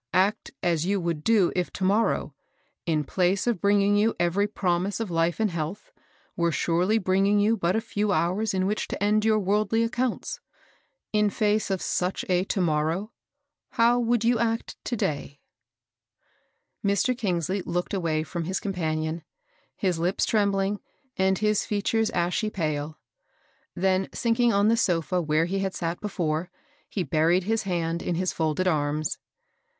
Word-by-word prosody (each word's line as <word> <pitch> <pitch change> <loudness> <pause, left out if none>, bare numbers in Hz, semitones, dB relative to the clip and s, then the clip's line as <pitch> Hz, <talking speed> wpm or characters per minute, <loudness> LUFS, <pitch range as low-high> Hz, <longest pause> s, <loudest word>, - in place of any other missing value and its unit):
Act 195 +3 +2
as 165 -3 +1
you 195 +2 0
would 170 -3 -2
do 215 -6 +3
if 180 -1 -1
to 190 - -4
morrow, 205 +4 +1 0.5
in 155 -2 +1
place 185 +5 +1
of 235 -7 0
bringing 200 0 +3
you 215 +2 +2
every 175 +4 +2
prom 180 -3 0
ise 205 - -4
of 225 -5 -3
life 165 +2 +1
and 215 -3 +1
health, 170 - -5 0.4
were 170 -1 +1
surely 175 +7 +1
bringing 195 +1 +2
you 215 +3 +3
but 180 -3 0
a 220 - +1
few 210 -1 -1
hours 185 +5 +1
in 185 0 +1
which 210 +2 -1
to - - -4
end 210 +1 +3
your 220 0 +3
worldly 210 +3 +1
accounts. 245 - -2 0.7
In 210 -1 +3
face 210 +1 +1
of 190 -2 -1
such 180 +1 -1
a 180 0 +3
Uhmorraw^ 170 +2 0 0.6
how 235 +1 +4
would 240 -1 +1
you 235 0 +3
act 230 0 -1
to 245 - -1
day 145 - -3 1.4
f^^ 200 - +2
Mr. 250 +6 +1
Eingsley 190 -4 -1
looked 175 +3 -2
away 165 -5 0
from 170 +1 -4
his 185 +3 -1
compan 160 -6 -2
ion, 160 +1 -4 0.5
his 180 -4 -1
lips 175 +3 +1
trembling, 200 -1 +1 0.4
and 190 0 +2
his 210 0 +1
features 215 +2 0
ashy 180 +3 0
pale; 155 -5 -3 0.8
then 190 +1 +1
sinking 235 0 +2
on 200 0 +3
the 230 +1 +3
sofa 180 -2 +1
where 155 0 +1
he 195 +3 -2
had 195 -1 -2 0.2
before 175 -4 -2
sat, - - -37 0.3
he 190 - -2
buried 165 +4 +2
his 220 +3 0
head 170 -1 -1
in 175 - -2
his 185 +2 -1
folded 160 +3 0
arms. 150 -2 0
190 Hz, 165 wpm, -26 LUFS, 170-210 Hz, 1.4 s, how